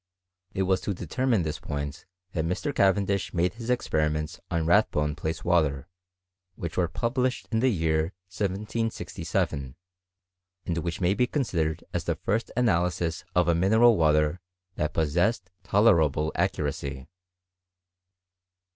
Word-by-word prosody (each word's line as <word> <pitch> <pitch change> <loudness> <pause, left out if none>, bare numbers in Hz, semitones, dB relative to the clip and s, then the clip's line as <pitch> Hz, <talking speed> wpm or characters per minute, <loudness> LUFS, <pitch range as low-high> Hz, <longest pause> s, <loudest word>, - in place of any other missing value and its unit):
It 95 - +1
was 95 0 +1
to 100 - -2
determine 115 - 0
this 80 -1 -3
point 70 0 -5 0.2
that 80 - -1
Mr. 90 - -2
Cavendish^ade 95 -3 +1
his 115 +1 -7
experiments 75 -10 0
ott 85 -1 0
Rathbone 75 -5 +2
place 80 +1 -4
water, 75 -5 +2 0.7
which 85 -1 -5
were 90 -2 +2
published 120 +8 -1
in 110 - +2
the 130 +3 +3
year 80 -6 +1 0.3
1767, 100 - -2 0.9
and 85 -2 -2
which 85 +2 -4
may 90 +2 +3
be 125 +4 +2
considered 85 - -1
as 90 - -2
the 85 - 0
first 100 +7 -1
analysis 90 -7 +1
of 90 -1 +3
a 85 - +4
mineral 110 +7 +5
water 75 0 +2 0.3
that 75 - -2
possessed 90 +6 +1
tolerable 80 -8 +3
accuracy. 65 -2 -2
85 Hz, 125 wpm, -27 LUFS, 80-105 Hz, 0.9 s, mineral